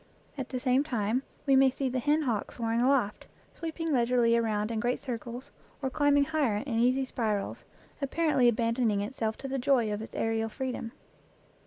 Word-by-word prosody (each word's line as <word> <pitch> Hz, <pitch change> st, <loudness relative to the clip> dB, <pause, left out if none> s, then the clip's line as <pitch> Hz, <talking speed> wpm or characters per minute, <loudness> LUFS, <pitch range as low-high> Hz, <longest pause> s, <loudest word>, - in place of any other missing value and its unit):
At 270 Hz, -3 st, -5 dB
the 255 Hz, -, -3 dB
same 255 Hz, +2 st, +2 dB
time 235 Hz, -3 st, 0 dB, 0.2 s
we 275 Hz, -2 st, +4 dB
may 265 Hz, 0 st, +6 dB
see 265 Hz, +1 st, -2 dB
the 255 Hz, 0 st, -1 dB
hen 300 Hz, +5 st, +2 dB
hawk 230 Hz, -7 st, -1 dB
soaring 230 Hz, 0 st, -1 dB
aloft, 250 Hz, -5 st, +1 dB, 0.3 s
sweeping 325 Hz, -1 st, -3 dB
leisurely 240 Hz, -2 st, +3 dB
around 215 Hz, -2 st, 0 dB
in 225 Hz, -, -1 dB
great 245 Hz, +3 st, 0 dB
circles, 245 Hz, 0 st, -6 dB, 0.3 s
or 265 Hz, -2 st, -2 dB
climbing 285 Hz, 0 st, +3 dB
higher 285 Hz, -9 st, +1 dB
in 230 Hz, -5 st, -1 dB
easy 255 Hz, +3 st, +3 dB
spirals, 215 Hz, -5 st, -2 dB, 0.4 s
ap 275 Hz, -, -1 dB
parently 300 Hz, -7 st, +3 dB
abandoning 230 Hz, -2 st, +1 dB
itself 220 Hz, 0 st, -3 dB
to 275 Hz, -, -6 dB
the 270 Hz, 0 st, -2 dB
joy 245 Hz, -5 st, +2 dB
of 210 Hz, -, -4 dB
its 220 Hz, -, -9 dB
aerial 225 Hz, 0 st, 0 dB
freedom. 250 Hz, -1 st, -4 dB
250 Hz, 180 wpm, -29 LUFS, 225-270 Hz, 0.4 s, may